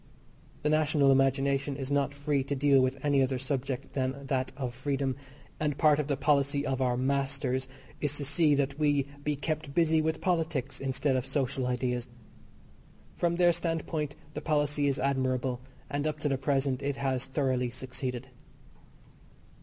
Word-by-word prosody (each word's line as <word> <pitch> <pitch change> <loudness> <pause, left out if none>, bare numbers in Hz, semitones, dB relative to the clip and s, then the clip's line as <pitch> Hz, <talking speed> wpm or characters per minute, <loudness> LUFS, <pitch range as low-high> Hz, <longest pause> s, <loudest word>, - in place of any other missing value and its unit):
The 150 - +2
national 150 -2 +4
imagination 135 +1 +2
is 135 0 -4
not 140 -2 +2
free 145 -1 0
to 140 - -1
deal 140 0 +4
with 130 +2 -1
any 140 -2 +4
other 130 0 +1
subject 130 0 -3
than 135 +1 -2
that 130 -1 -1
of 130 -3 -3
freedom, 135 0 -1 0.4
and 150 -2 0
part 150 -2 +4
of 150 - -1
the 140 -2 0
policy 140 0 +2
of 135 -2 -1
our 125 -1 +2
"masters" 135 0 0 0.3
is 145 -1 0
to 145 - -3
see 150 0 +3
that 140 +1 -1
we 145 -2 +2 0.2
be 150 0 0
kept 150 -1 -3
busy 160 -2 +4
with 160 0 -1
politics 160 -7 -1
instead 135 +1 0
of 130 0 -1
social 135 -1 -1
ideas. 125 0 -1 1.1
From 170 0 +1
their 175 0 +5
standpoint 160 -3 -2 0.2
the - - -4
policy 145 -2 +1
is 135 -1 +1
admirable, 130 -2 0 0.3
and 145 +1 -1
up 155 -1 -2
to 150 - +1
the 135 - +1
present 135 -1 0
it 140 0 -1
has 135 -2 -1
thoroughly 130 -3 0
succeeded. 125 0 -5
140 Hz, 165 wpm, -29 LUFS, 130-145 Hz, 1.1 s, their